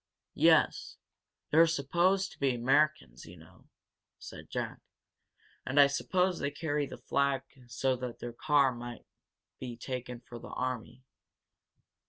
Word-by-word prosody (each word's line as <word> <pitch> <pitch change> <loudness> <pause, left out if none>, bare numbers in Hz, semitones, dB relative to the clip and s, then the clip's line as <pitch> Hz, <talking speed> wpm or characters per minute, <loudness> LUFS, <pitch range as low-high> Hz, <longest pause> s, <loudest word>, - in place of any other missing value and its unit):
"Yes, - - +3 0.5
they're 165 +2 +6
supposed 175 +6 +1
to - - -16
be 135 -3 +1
Americans, 135 - +1
you 90 +2 -12
know," 80 0 -19 0.5
said - - -11
Jack. - - -4 0.8
"And 130 +2 +1
I 140 - +10
suppose 180 +6 0
they 140 - -1
carry 145 -1 -2
the - - -9
flag 140 -1 0 0.2
so 130 +3 0
that 125 -1 -6
the 120 -1 -7
car 140 -1 +2
won't 120 -1 -8 0.5
be 125 -2 -6
taken 125 -1 -5
for 120 0 -11
the - - -10
army. 130 0 -4
135 Hz, 135 wpm, -31 LUFS, 120-150 Hz, 0.8 s, I